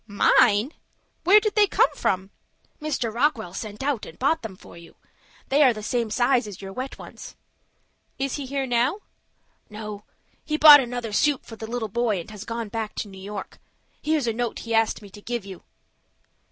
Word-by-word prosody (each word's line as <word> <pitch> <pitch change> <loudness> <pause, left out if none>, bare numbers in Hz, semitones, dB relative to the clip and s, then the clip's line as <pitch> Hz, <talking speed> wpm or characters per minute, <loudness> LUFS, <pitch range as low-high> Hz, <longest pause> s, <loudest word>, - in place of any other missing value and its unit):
"Mine! 210 +4 +3 0.5
Where 395 +4 +8
did 425 -1 -1
they 420 -1 +4
come - - +3
from?" 190 +1 -1 0.5
"Mr. 270 -7 -2
Rockwell 235 - 0
sent 210 +4 -6
out 275 -5 -1
and - - -10
bought 315 +5 +1
them 220 -5 -7
for 185 - -15
you. 170 0 -14 0.5
They 280 +3 +3
are 260 -4 +6
the 215 -1 -8
same 235 0 -1
size 245 +1 +2
as 200 -3 -9
your 195 -1 -8
wet 260 +5 -5
ones." - - -11 0.8
"Is 275 +1 -2
he 280 -2 -5
here 275 0 -2
now?" 250 - +1 0.7
"No. 210 -1 -8 0.4
He 305 0 -1
bought 300 -1 +10
another 240 -4 -4
suit 290 +4 +2
for 225 - -10
the 220 0 -7
little 235 -2 -2
boy, 220 -2 0
and 170 - -9
has 210 0 -9
gone 230 -1 -4
back 220 0 -4
to - - -4
New 190 -1 -12
York. 200 0 -7 0.4
Here's 305 -3 0
a 230 - 0
note 240 +1 -2
he 230 - -5
asked 225 -1 +1
me 200 - -13
to 205 - -12
give 235 -2 -4
you." 190 -2 -9
230 Hz, 195 wpm, -24 LUFS, 210-270 Hz, 0.8 s, bought